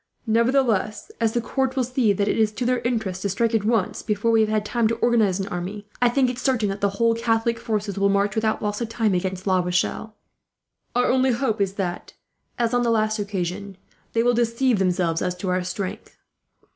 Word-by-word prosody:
"Nevertheless, 230 -2 +1
as 225 -1 +2
the 240 - 0
court 265 +2 -1
will 260 - +1
see 245 -3 +1
that 200 +1 0
it - - +1
is 215 -1 +3
to 235 +3 -3
their 250 0 +2
interest 220 -6 -2
to 200 - -1
strike 225 +4 0
at 220 -3 +2
once, 220 -3 0
before 215 +1 0
we 225 -1 +4
have 215 - +2
had 215 -1 0
time 235 +1 +1
to 230 - 0
organize 225 -5 +2
an 195 - -3
army, 190 +4 -5 0.2
I 245 - +5
think 260 +1 +2
it 250 0 -3
certain 250 -6 +1
that 195 +1 -4
the 200 - +3
whole 230 +1 +3
Catholic 230 0 0
forces 210 -3 -2
will 200 0 +3
march, 200 0 +1
without 220 -1 0
loss 210 +2 -2
of 230 - -2
time, 225 -3 0
against 185 +1 -2
La 185 -2 +3
Rochelle. 180 +4 -1 0.8
Our 245 0 +3
only 260 +1 +3
hope 230 -4 -1
is 195 -1 0
that, 185 -3 -4 0.4
as 235 0 0
on 245 - +3
the 240 - +1
last 215 -1 +1
occasion, 195 -1 -4 0.4
they 230 - +2
will 245 0 +3
deceive 235 0 +1
themselves 175 -3 +1
as 180 - -1
to 185 +1 -4
our 180 0 0
strength. 185 +1 -5
215 Hz, 220 wpm, -23 LUFS, 195-235 Hz, 0.8 s, I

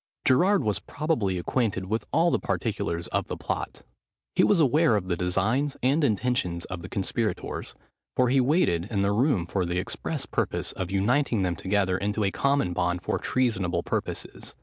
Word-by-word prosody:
Gerard 180 +6 +4
was 105 -4 +1
probably 140 - -1
acquainted 95 0 -1
with 110 +4 -2
all 170 +2 +3
the - - +2
particulars 85 0 -2
of - - -1
the - - -4
plot. - - -4 0.5
He - - +3
was 205 - +4
aware 150 -2 +4
of 95 -3 -2
the 90 - +1
designs 110 +11 0
and 140 +5 +3
intentions 105 -7 0
of 95 -2 -6
the 90 - -8
conspirators; 105 +3 -3 0.4
for 125 -1 +3
he 135 +1 +4
waited 125 - +2
in 100 -3 0
the 100 - +2
room 110 - +2
for 95 +2 -1
the 85 0 -2
express 90 - -3
purpose - - -2
of 95 -2 -4
uniting 110 +3 +1
them 90 -2 0
together 95 +1 0
into 105 +1 -1
a 100 - +1
common 140 -8 +1
bond 90 0 -1
for - - -1
treasonable 110 -9 0
purposes. - - -4
105 Hz, 175 wpm, -26 LUFS, 90-130 Hz, 0.5 s, Gerard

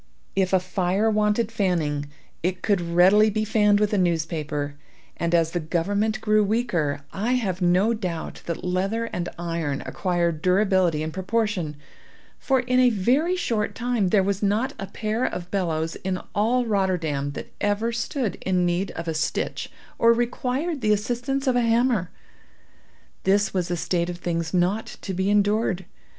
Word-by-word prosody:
If 190 -1 +1
a 190 - +4
fire 185 +4 0
wanted 210 +1 +1
fanning, 165 -9 0 0.3
it 185 +1 -2
could 200 -4 +2
readily 180 +5 +5
be 215 +1 -1
fanned 210 -1 +3
with 210 0 +1
a 205 - +3
newspaper, 155 -4 -1 0.4
and 170 0 0
as 165 -1 +2
the 175 - -1
government 200 +7 0
grew 215 -1 +3
weaker, 185 -10 0
I 220 +6 0
have 195 -7 -1
no 180 +6 +3
doubt 180 -7 -4
that 170 - -4
leather 195 +6 -1
and 175 -1 -2
iron 165 -5 -2
acquired 170 -4 -1
durability 185 -4 +2
in 160 - -3
proportion, 190 -3 -1 0.6
for, 265 -2 +2
in 250 +1 +1
a 250 -1 +6
very 255 - +2
short 225 - -1
time, 240 -5 0
there 195 +1 +3
was 200 0 -1
not 215 +7 +1
a 195 - -4
pair 220 +4 -2
of 180 -7 -3
bellows 165 -4 -1
in 185 -1 -3
all 240 +4 +2
Rotterdam 175 -9 0
that - - -8
ever 205 +3 +1
stood 235 0 -2
in 185 -1 +1
need 175 +2 0
of 165 +1 -5
a 165 - 0
stitch 155 0 -2 0.3
or 230 0 +6
required 255 +6 -1
the 215 -1 +3
assistance 245 +6 -1
of 260 -2 +2
a 245 - +3
hammer. 230 -5 +2 1.1
This 200 +2 +2
was 180 -2 -1
a 175 - -1
state 170 +1 0
of 175 - -5
things 170 -2 -2
not 185 +4 0
to 190 - -3
be 190 +2 0
endured. 205 -2 +2
195 Hz, 165 wpm, -24 LUFS, 175-220 Hz, 1.1 s, a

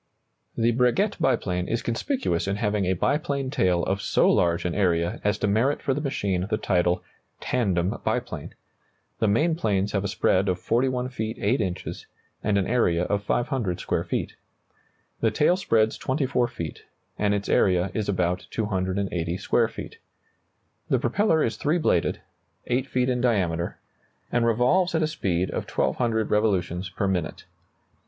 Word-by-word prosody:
The 115 +1 +3
Breguet 125 - +1
biplane 90 -9 0
is 115 - -1
conspicuous 120 - -1
in 100 - 0
having 105 -2 0
a 95 - +2
biplane 140 - 0
tail 90 -9 +2
of 95 +1 -1
so - - +2
large 85 0 +2
an 90 - 0
area 85 -3 +1
as 105 0 +1
to 105 - 0
merit 115 +8 +2
for 135 - 0
the 145 - -2
machine 100 -10 -1
the 110 - +1
title 90 -3 +1 0.4
"tandem 95 -7 0
biplane." - - -3 0.6
The 110 - +2
main 150 +12 +3
planes 105 - 0
have 100 -2 0
a - - -1
spread 95 0 +2
of 90 - 0
41 125 +5 0
feet 110 -2 -4
8 115 +5 +1
inches, 95 -3 -4 0.4
and 105 -1 +2
an 95 - +1
area 90 -8 +2
of 100 +2 0
500 120 - -1
square - - -1
feet. - - -3 0.9
The - - +3
tail 160 +4 +3
spreads 110 - +1
24 130 -3 0
feet, 85 -9 -6 0.4
and 105 -1 +2
its 100 0 -3
area 90 -1 +2
is 105 -2 -2
about 90 -2 0
280 95 -4 -1
square 115 +4 +2
feet. 110 - -9 0.9
The - - +3
propeller 160 - +2
is 115 -2 -1
three 150 +8 +1
bladed, 90 - +1 0.4
8 125 +2 0
feet 125 -1 0
in 125 -1 0
diameter, 90 -8 0 0.5
and 120 -1 +2
revolves 130 +11 +2
at 160 - +2
a - - +2
speed 95 - -1
of - - -4
1,200 110 -3 0
revolutions 95 -4 +1
per 95 +2 -2
minute. 90 -4 -2
105 Hz, 160 wpm, -25 LUFS, 90-125 Hz, 0.9 s, The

